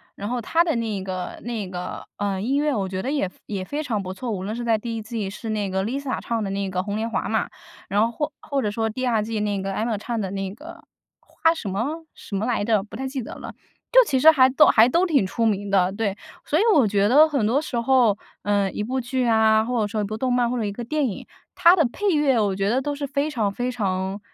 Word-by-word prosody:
然 205 +2 -5
后 245 -1 -2
它 330 +9 +2
的 325 -4 0
那 215 -4 -2
个 185 -1 -5
那 225 -5 -4
个， 180 -1 -6
嗯， 200 -2 -2
音 270 +4 +1
乐 295 0 +1
我 195 -3 -1
觉 185 0 -4
得 270 - -3
也 275 -11 0 0.2
也 195 -3 -4
非 295 +6 -3
常 220 -7 -2
不 185 0 -5
错， 235 +4 -5
无 190 -2 -3
论 215 +3 -3
是 240 - -4
在 230 -2 +2
第 230 +1 -5
1 220 - -4
季 215 -3 -4
是 220 +3 -7
那 210 -2 -1
个 190 +1 -1
Lisa 265 +4 -3
唱 230 -1 -2
的 195 - -3
那 195 0 -2
个 185 -1 -2
《红 205 0 -4
莲 225 +2 -2
华》 190 - -2
嘛， 220 - 0 0.4
然 205 +2 +2
后 230 +1 +2
或 295 +6 -3
或 280 -1 -2
者 210 - -1
说 225 +1 -1
第 255 +4 -3
2 225 -3 +2
季 220 0 -3
那 205 -2 -1
个 195 0 -3
Emma 220 +1 -1
唱 230 +3 -4
的 195 -3 -3
那 195 -1 -4
个 310 +8 -12 0.3
花 325 0 +1
什 275 -11 -7
么 285 - -3
什 200 - -8
么 215 - -1
来 235 -4 0
着？ 215 -2 +2
不 215 - -12
太 265 +3 -4
记 265 -1 -4
得 - - -8
了。 - - -8 0.4
就 - - +8
其 265 -7 +1
实 320 +4 +8
还 260 -4 +5
都 285 +4 +5
还 230 +3 +6
都 345 +7 +3
挺 295 - +3
出 230 +3 -1
名 205 -2 0
的， 190 -2 +3
对， 200 -1 -2 0.3
所 300 - +1
以 380 - +3
我 270 -9 +5
觉 200 0 +2
得 300 +7 +6
很 275 -8 0
多 260 +7 +2
时 250 -6 -3
候， 235 -4 +3 0.2
嗯， 200 -1 0
一 210 - -3
部 260 +4 -2
剧 255 +1 -1
啊， 220 -1 +4
或 240 0 -1
者 - - +1
说 215 0 -2
一 - - -1
部 215 +2 -4
动 255 +1 0
漫 245 -1 +2
或 250 - -2
者 230 - -1
一 200 - -2
个 240 +4 -6
电 295 +4 0
影， 205 - -6 0.3
它 360 -1 +6
的 325 -5 +3
配 410 -1 0
乐， 275 -5 +3
我 200 -3 +1
觉 195 0 -1
得 260 +2 +1
都 290 +1 -3
是 285 0 -4
非 280 +2 -1
常 220 -8 -1
非 245 +3 -2
常 190 -3 -2
225 Hz, 305 characters per minute, -23 LUFS, 200-265 Hz, 0.4 s, 就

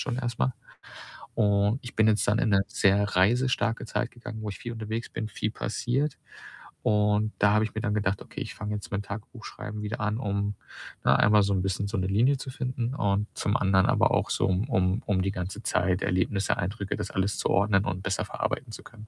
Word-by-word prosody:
schon 125 - -2
erst 120 -3 -3
mal.“ 65 0 +1 0.8
Und 105 +2 +2
ich 120 - -9
bin 110 0 +5
jetzt 105 -1 +2
dann 105 +2 +3
in 110 - +2
'ne 95 -1 +4
sehr 100 +1 +3
reisestarke 120 +4 +2
Zeit 120 +1 -2
gegangen, 120 -2 -8
wo 105 - -3
ich 100 - -8
viel 120 - -6
unterwegs 110 +1 -4
bin, 110 - -4
viel 110 +1 -2
passiert. 125 +7 -1 0.7
Und 105 0 +2
da 105 0 +5
habe 105 +1 +4
ich 110 - -7
mir - - -1
dann 105 -3 0
gedacht: 100 -2 0
„Okay, - - -8
ich - - -5
fange 105 +1 -4
jetzt 105 - -7
mit 100 0 -1
dem - - -19
Tagebuchschreiben 105 0 -7
wieder 105 +2 -4
an, 105 +1 0
um, 100 -2 -1 0.5
ne, - - +5
einmal 105 0 +5
so 100 0 +1
'n 95 - +1
bisschen 95 +1 -1
so 110 - -3
'ne 95 -1 0
Linie 120 +9 +3
zu 130 - -7
finden 125 -1 -3
und 105 -4 +1
zum 105 +2 0
anderen 95 -1 +3
aber - - +3
auch - - +1
so, - - +2
um 95 +6 0
um 95 -2 +1
um 95 -3 +1
die 95 +1 0
ganze 95 +4 -5
Zeit, 90 +1 +1
Erlebnisse, 95 +2 +1
Eindrücke, 100 +1 -3
das 105 -2 -4
alles 95 +1 0
zu - - -1
ordnen 100 0 +3
und 95 -2 -3
besser - - -1
verarbeiten 110 - -3
zu - - -8
können.“ 110 -2 -13
105 Hz, 225 wpm, -27 LUFS, 100-115 Hz, 0.8 s, bin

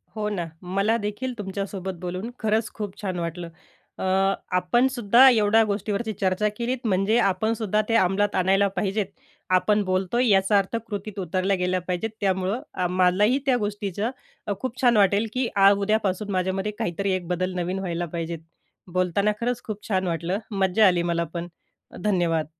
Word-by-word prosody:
हो 215 -1 -2
ना, 185 -5 -2 0.2
मला 195 +5 +1
देखील 220 +5 -3
तुमच्यासोबत 195 -1 -4
बोलून 185 +5 -4
खरंच 220 0 0
खूप 205 -3 -6
छान 185 -3 -3
वाटलं. 170 0 -4 0.5
अ, - - -5 0.5
आपणसुद्धा 240 +5 +4
एवढ्या 225 -2 +4
गोष्टीवरची 210 +1 -2
चर्चा 190 +3 +1
केलीत, 245 +2 -1
म्हणजे 195 +2 +2
आपणसुद्धा 215 +1 +1
ते 230 - +2
अमलात 205 0 +2
आणायला 195 +2 +3
पाहिजेत, 205 +1 0 0.4
आपण 205 +3 +3
बोलतोय, 190 +6 0
याचा 195 +1 +4
अर्थ 195 +3 0
कृतीत 205 -1 -5
उतरल्या 185 +2 0
गेल्या 180 0 0
पाहिजेत, 180 +5 -1
त्यामुळं 190 - -1
मलाही 185 +7 +3
त्या 260 -3 +3
गोष्टीचं 205 0 -2 0.4
अ, 205 - 0
खूप 260 0 -4
छान 240 -4 +4
वाटेल, 200 +2 +3
की 255 -1 0
आज, 200 0 +6
उद्यापासून 205 -1 0
माझ्यामध्ये 190 +2 -1
काहीतरी 190 +3 -1
एक 180 -2 -5
बदल 185 +1 -1
नवीन 180 +2 -2
व्हायला 175 -2 -2
पाहिजेत, 165 0 -3 0.5
बोलताना 185 +3 +1
खरंच 245 0 -1
खूप 210 -2 -6
छान 190 -3 0
वाटलं. 170 +3 -1
मज्जा 195 +1 +3
आली 175 -2 +2
मला 170 -1 0
पण. 170 0 -4 0.6
धन्यवाद. 175 -6 +1
195 Hz, 155 wpm, -24 LUFS, 185-215 Hz, 0.6 s, आज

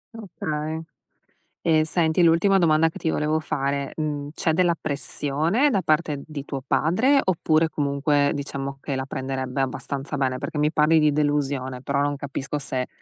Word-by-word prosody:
Okay, 160 -7 -4 0.8
e 155 -1 +3
senti, 160 +1 +1
l'ultima 170 +4 +4
domanda 165 -2 +4
che - - -10
ti 160 - -1
volevo 155 0 0
fare: 140 -2 -2
mhmm, 145 -2 -3
c'è 160 - 0
della 170 +1 +2
pressione 155 - 0
da 200 -8 +1
parte 155 -3 0
di 150 -3 -6
tuo 135 -2 -5
padre, 225 - +3
oppure, 160 -3 +2
comunque, 145 0 +1
diciamo 140 -1 -4
che 140 - -3
la 130 - -3
prenderebbe 130 0 -3
abbastanza 140 +2 -3
bene? 130 -2 0
Perché - - -5
mi 150 +1 +3
parli 155 +1 +4
di 150 -1 +3
delusione, 140 -3 -1
però 140 +1 0
non 145 0 0
capisco 140 +1 -4
se, 130 -2 -2
150 Hz, 160 wpm, -24 LUFS, 140-160 Hz, 0.8 s, l'ultima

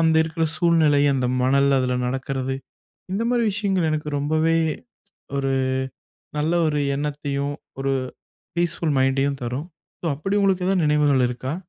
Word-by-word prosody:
அங்க 160 -1 +4
இருக்குற 160 0 -1
சூழ்நிலை, 160 -4 +4
அந்த 130 -2 0 0.2
மணல், 140 +2 +3
அதுல 125 -1 0
நடக்குறது. 135 0 -2 0.6
இந்த 210 +4 0
மாரி 240 -1 +2
விஷயங்கள் 195 -5 0
எனக்கு 150 0 -2
ரொம்பவே 155 +3 +2 0.8
ஒரு 135 -1 0 0.9
நல்ல 155 +3 +1
ஒரு 150 -1 0 0.2
எண்ணத்தையும், 145 -1 -2 0.3
ஒரு 135 0 0 0.6
ஃபீஸ்ஃபுல் 170 -2 0
மைண்டயும் 135 +1 +1
தரும். 125 +7 -3 0.3
சோ, - - -6
அப்பிடி 195 +8 -1
உங்களுக்கு 190 -2 +2
ஏதாவது 190 -4 +2
நினைவுகள் 145 -4 +3
இருக்கா? 130 +3 -4
150 Hz, 135 wpm, -23 LUFS, 135-165 Hz, 0.9 s, அங்க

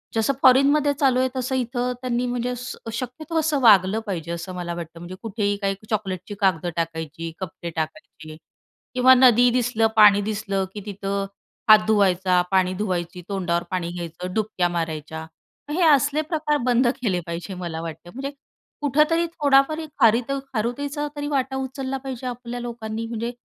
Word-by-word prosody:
जसं 225 +5 +2
फॉरेनमध्ये 280 +3 +5
चालू 265 -3 +3
आहे 260 0 +2
तसं 255 +1 -1
इथं 250 0 -1
त्यांनी 250 -1 -1
म्हणजे 245 0 -2
स 250 +1 -6 0.2
शक्यतो 280 +7 -3
असं 310 -2 +1
वागलं 205 -2 +6
पाहिजे, 170 -4 -4
असं 170 +2 -5
मला 175 -1 -4
वाटतं. 170 -1 -8
म्हणजे 175 +2 -8
कुठेही 205 -2 -1
काही 195 0 0
चॉकलेटची 200 -2 -3
कागद 180 -4 +2
टाकायची, 165 0 -4
कपडे 175 -2 -6
टाकायचे 155 -1 -6 0.6
किंवा 255 +1 +7
नदी 245 -1 +6
दिसलं, 235 -2 +2
पाणी 205 -1 +7
दिसलं 200 -2 -2
की 210 - -6
तिथं 200 -1 -3 0.4
हात 215 0 +10
धुवायचा, 190 -3 +3
पाणी 185 -1 +3
धुवायची, 180 -3 -3
तोंडावर 175 -3 -1
पाणी 180 -2 -2
घ्यायचं, 175 +1 -6
डुबक्या 215 -5 0
मारायच्या. 160 -2 -4 0.5
मग 295 - -2
हे 355 - +3
असले 290 +1 +4
प्रकार 300 -1 +1
बंद 245 0 +3
केले 195 -7 0
पाहिजे 170 +3 -5
मला 170 -3 -5
वाटतं. 165 +1 -8
म्हणजे 275 +2 -4 0.5
कुठेतरी 305 +4 +3
थोडाफारी 300 0 +2
खारिताऊ 235 +5 +3
खारुताईचा 280 +6 -2
तरी 290 0 -3
वाटा 270 -2 -1
उचलला 265 0 -3
पाहिजे 255 -1 -5
आपल्या 245 0 -5
लोकांनी. 230 -2 -5
म्हणजे 230 +1 -3
220 Hz, 155 wpm, -23 LUFS, 180-260 Hz, 0.6 s, हात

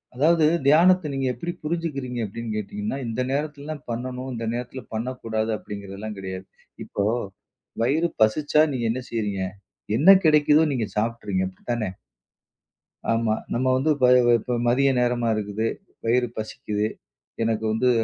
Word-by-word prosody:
அதாவது, 155 +4 +4 0.2
தியானத்த 170 +3 +5
நீங்க 135 -1 -1
எப்டி 170 +9 -4
புரிஞ்சிக்கிறீங்க 150 -6 -3
அப்டின்னு 110 +1 -5
கேட்டீங்கன்னா, 205 - -3
இந்த 115 +2 -2
நேரத்துலலாம் 145 +1 -3
பண்ணணும், 125 +2 -4
இந்த 115 -1 -4
நேரத்துல 125 +2 -5
பண்ணக் 125 +3 -4
கூடாது 110 0 -1
அப்டிங்கறதெல்லாம் 100 0 -7
கெடையாது. 95 0 -6 0.4
இப்போ 100 - -2 0.8
வயிறு 155 +8 +2
பசிச்சா 145 +7 +3
நீங்க 125 -3 -2
என்ன 130 - -3
செய்றீங்க? 105 -4 -2 0.5
என்ன 155 +10 +7
கிடைக்குதோ 150 0 +5
நீங்க 115 -5 -1
சாப்ட்றீங்க. 105 -4 -1
அப்டித்தான? 110 +4 -3 1.3
ஆமா. 115 -1 +2 0.2
நம்ம 125 +2 0
வந்து 135 +4 +1
இப்ப 130 -3 +3 0.3
இப்ப 125 +2 -2
மதிய 135 +3 +3
நேரமா 120 -1 +1
இருக்குது. 105 +1 -2 0.4
வயிறு 120 +2 +3
பசிக்குது. 110 -1 -2 0.6
எனக்கு 110 -1 0
வந்து 120 +3 +2
120 Hz, 130 wpm, -24 LUFS, 110-140 Hz, 1.3 s, என்ன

